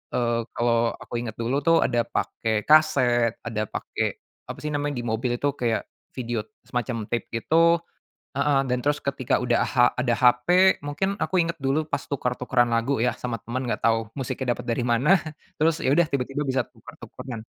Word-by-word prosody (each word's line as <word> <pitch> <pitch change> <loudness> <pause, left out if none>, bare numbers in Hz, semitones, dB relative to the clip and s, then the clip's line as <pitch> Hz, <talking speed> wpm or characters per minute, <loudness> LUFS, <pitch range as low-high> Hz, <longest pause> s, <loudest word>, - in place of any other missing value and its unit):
eee, 120 -1 +1
kalau 115 -1 +1
aku 120 - -6
inget 115 -2 -5
dulu 120 +5 -1
tuh 165 +3 +4
ada 120 -2 0
pakai 110 -2 -1
kaset 125 -7 +4
ada 110 -2 -3
pakai - - -3 0.3
apa - - -5
sih 150 - -2
namanya 145 -1 -1
di 120 - -4
mobil 120 +2 -1
itu 140 +3 0
kayak 120 -5 -1 0.3
video 120 -4 -3 0.2
semacam 120 -3 -4
tape 120 - -1
gitu 165 +8 +3 0.6
heeh 140 -1 +3
dan 125 - +1
terus 145 0 +1
ketika 135 -3 -1
udah 120 -1 +2
ha 125 -3 +4
ada 125 -1 +1
hp 130 +11 +4
mungkin 190 +8 -2
aku 185 -1 +1
inget 170 0 -2
dulu 145 +3 -1
pas - - -2
tuker-tukeran 125 -3 0
lagu 115 +2 0
ya 125 - +1
sama 115 -3 -4
teman, 125 +3 -4
enggak 120 - -2
tahu 115 0 +2
musiknya 130 -1 -2
dapat 125 0 -9
dari 120 +1 0
mana, 130 +11 +4 0.4
terus 160 +1 +2
ya - - +1
udah 175 - +4
tiba-tiba 140 0 -2
bisa 130 -1 +1
tuker-tukeran, 115 -4 -10
125 Hz, 180 wpm, -25 LUFS, 120-145 Hz, 0.6 s, tuh